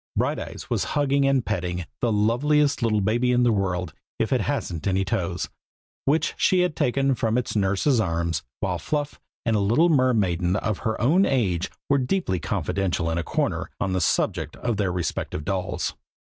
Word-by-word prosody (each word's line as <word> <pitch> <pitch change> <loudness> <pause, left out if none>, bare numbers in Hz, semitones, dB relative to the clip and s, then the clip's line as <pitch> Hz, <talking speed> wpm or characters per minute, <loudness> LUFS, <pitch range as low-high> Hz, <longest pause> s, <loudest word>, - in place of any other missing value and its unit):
Brighteyes - - -2
was - - 0
hugging 140 -1 +3
and 135 -3 +2
petting 90 -1 -2
"the 120 - +1
loveliest 140 +8 +2 0.2
baby 120 +4 +2
in 125 0 +3
the 120 - +4
world, 95 -3 -1 0.2
if - - 0
it - - +2
hasn't 85 +2 -2
any 95 0 +1
toes," 95 -3 -2 0.6
which 150 +4 +2
she 185 -1 +3
had 180 -4 0
taken 135 +1 +2
from 115 -1 0
its 125 - -2
nurse's 100 +6 +2
arms, 85 -5 0 0.2
while - - -1
Fluff 145 -1 -3 0.3
and 115 -2 +2
a - - +2
little 120 +13 +3
mermaiden 100 - +2
of 105 0 -1
her 110 -1 -2
own 160 +11 +4
age 95 -9 0 0.2
were 140 0 +3
deeply 125 - 0
confidential 90 -1 -1
in 80 - 0
a - - -2
corner, - - -1
on 95 - -1
the 95 - 0
subject - - 0
of 120 -4 -2
their 95 -3 0
respective 85 -3 -3
dolls. 95 -2 -2
110 Hz, 175 wpm, -24 LUFS, 90-135 Hz, 0.6 s, the